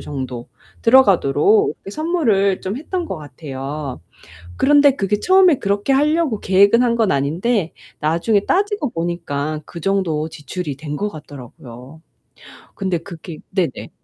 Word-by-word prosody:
정도 130 -4 -6 0.3
들어가도록 265 - +4
이렇게 195 - -11
선물을 225 - +1
좀 195 +5 -3
했던 345 +4 -4
것 190 - -5
같아요. 145 - -7 0.6
그런데 290 0 +5
그게 205 -2 -1
처음에 370 -4 +5
그렇게 200 +5 -1
하려고 295 -4 +1
계획을 200 +5 +4
한 240 -2 +2
건 225 -4 +2
아닌데 165 - 0 0.3
나중에 170 +7 +1
따지고 405 - 0
보니까 155 -3 -3
그 170 - -10
정도 165 -4 0
지출이 150 0 -6
된 150 0 -6
것 210 +6 -2
같더라고요. 135 - -12 0.7
근데 190 -3 -1
그게 165 -2 -10
네네. 180 -8 -2
190 Hz, 300 characters per minute, -19 LUFS, 150-240 Hz, 0.7 s, 그런데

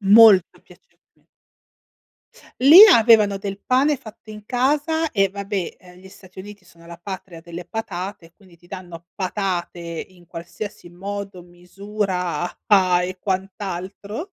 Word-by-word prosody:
Molto 205 -2 +6
piacevolmen - - -25 1.3
Lì 295 +8 +9
avevano 215 -5 +4
del 195 0 -6
pane 275 +4 +2
fatto 220 -3 -14
in 210 -1 -11
casa 295 +7 0
e 195 -2 +2
vabbè, 200 -2 -5
ehm, 180 -1 -17
gli 190 - -14
Stati 190 -1 -14
Uniti 205 0 -13
sono 170 -2 -20
la 170 0 -11
patria 185 -2 -8
delle 170 +1 -9
patate 185 -2 -6
e 165 - -23
quindi 185 -4 -21
ti 175 - -23
danno 175 -2 -10
patate 185 -2 -3
in 170 +1 -9
qualsiasi 175 +3 -9
modo, 195 +1 -7
misura 180 +1 -4 0.3
a 185 -3 +4
e 185 +1 -6
quant'altro. 195 - -5
195 Hz, 135 wpm, -21 LUFS, 175-210 Hz, 1.3 s, Lì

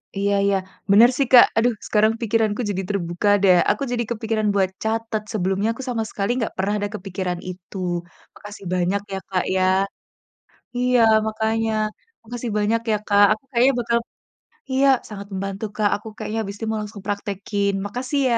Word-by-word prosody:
Iya 200 +1 +1
iya 200 -1 +3 0.3
bener 230 +4 +8
sih 275 -3 +1
Kak, 245 - +10
aduh 240 +1 +3
sekarang 215 +1 +3
pikiranku 220 0 +1
jadi 190 -1 -1
terbuka 180 0 -1
deh 185 -2 +6 0.2
aku 280 - -2
jadi 240 -1 0
kepikiran 220 -1 -1
buat 190 -2 +2
catat 220 -1 -2
sebelumnya 195 +2 0
aku 265 - -8
sama 225 -2 -1
sekali 200 +2 -3
nggak 225 - -2
pernah 195 +2 0
ada 205 - -2
kepikiran 185 -2 -4
itu 185 +2 -9 0.6
makasih 205 -2 -11
banyak 185 +3 +1
ya - - -1
Kak, 185 -2 0
ya, 185 - +2 1.1
iya 250 0 +3 0.3
makanya 220 +1 0 0.5
makasih 240 +1 -5
banyak 220 +2 +1
ya - - +3
Kak, 205 0 +6
aku 215 - -10
kayaknya 255 +3 +4
bakal 235 0 +1 0.7
iya 270 +1 +3 0.2
sangat 200 -1 -8
membantu 195 +2 -4
Kak, 210 -1 +3
aku 210 +2 -9
kayaknya 220 - -4
habis 200 -1 -5
ini 225 - -5
mau 220 - -1
langsung 210 -1 -8
praktekin 200 0 -2
makasih 255 +7 -2
ya. 230 - +3
210 Hz, 170 wpm, -22 LUFS, 200-225 Hz, 1.1 s, Kak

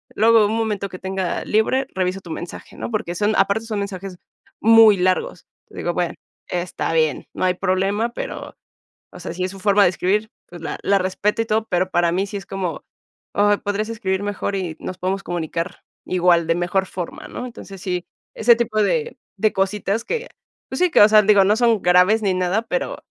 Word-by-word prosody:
luego 225 0 +5
un 220 - -1
momento 210 -3 -2
que 185 - -9
tenga 190 -1 -3
libre, 260 +5 +1
reviso 185 +1 -1
tu 175 - -13
mensaje, 175 - -8
¿no?, - - -5
porque 215 -5 -2
son 210 +4 +1
aparte 220 +3 +2
son 215 -2 -3
mensajes 195 -2 -5 0.4
muy 225 -2 +7
largos. 180 -1 -1 0.2
Te - - -15
digo, 175 - -2
bueno, 175 -1 -1 0.4
está 175 -1 -2
bien, 155 -3 +1
no - - -1
hay 180 - +3
problema, 195 +4 0
pero, - - -7 0.5
o - - -12
sea, - - -6
si 180 +1 -3
es 185 - -2
su 195 - -11
forma 205 0 +4
de - - +5
escribir, 205 +4 -1 0.2
pues 175 -1 -11
la - - -5
la 200 0 +3
respeto 190 +4 0
y 225 - -2
todo. 220 0 0
Pero 185 +1 0
para 175 -1 +2
mí 190 +2 0
sí 200 0 -5
es 195 - -9
como, 190 -3 -4 0.5
oh, 205 0 +3
podrías 205 +1 -2
escribir 195 -3 -2
mejor 200 -1 -3
y 175 -5 -4
nos 185 - -6
podemos 190 +1 -1
comunicar 170 +1 -4 0.2
igual 175 -2 +3
de 165 - +2
mejor 180 +2 0
forma, 175 -2 -6
¿no? 250 - -6
Entonces, 195 -5 -11
sí, 180 -2 -3 0.3
ese 235 +1 +5
tipo 220 -2 0
de 475 - -1 0.2
de 215 -1 +2
cositas 200 +3 -1
que, 480 +1 -3 0.4
pues 265 - -4
sí, 365 - +4
que, - - +6
o 205 - +8
sea, 215 0 +7
digo, 205 -1 +5
no 210 +2 +4
son 230 -4 +3
graves 180 +5 +4
ni 190 -2 +2
nada, 185 +4 0
pero, - - -3
195 Hz, 205 wpm, -21 LUFS, 180-215 Hz, 0.5 s, o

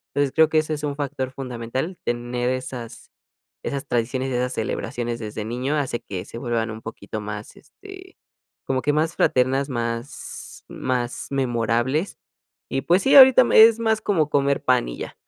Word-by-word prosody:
Entonces, 145 -1 +1
creo 160 -1 +5
que 160 - +1
ese 155 0 +1
es 150 - -5
un 145 -1 -2
factor 140 -2 -3
fundamental, 130 +6 -5
tener 120 +1 -2
esas 125 -2 -6 0.5
esas 140 0 -3
tradiciones 125 +3 -1
y - - -2
esas 125 +1 -1
celebraciones 120 +1 -3
desde 105 -1 -5
niño, 125 +6 -2
hace 135 -5 -2
que 90 -2 -6
se 115 - -9
vuelvan 115 -2 -1
un 110 +1 -8
poquito 110 -1 -7
más, 105 0 -7
este, 380 -1 -14 0.5
como 130 -1 0
que 145 - +1
más 155 +3 0
fraternas, 135 +2 +2
más 115 0 -5
más 125 -1 -3
memorables. 130 - 0 0.5
Y, 135 +1 0
pues 180 +6 +3
sí, 270 - +4
ahorita 260 -2 +10
me 220 - +6
es 225 0 +6
más 220 -1 +1
como, 160 -7 +1
comer 140 0 +1
pan 125 - +2
y - - -7
ya. - - -7
130 Hz, 175 wpm, -23 LUFS, 120-150 Hz, 0.5 s, ahorita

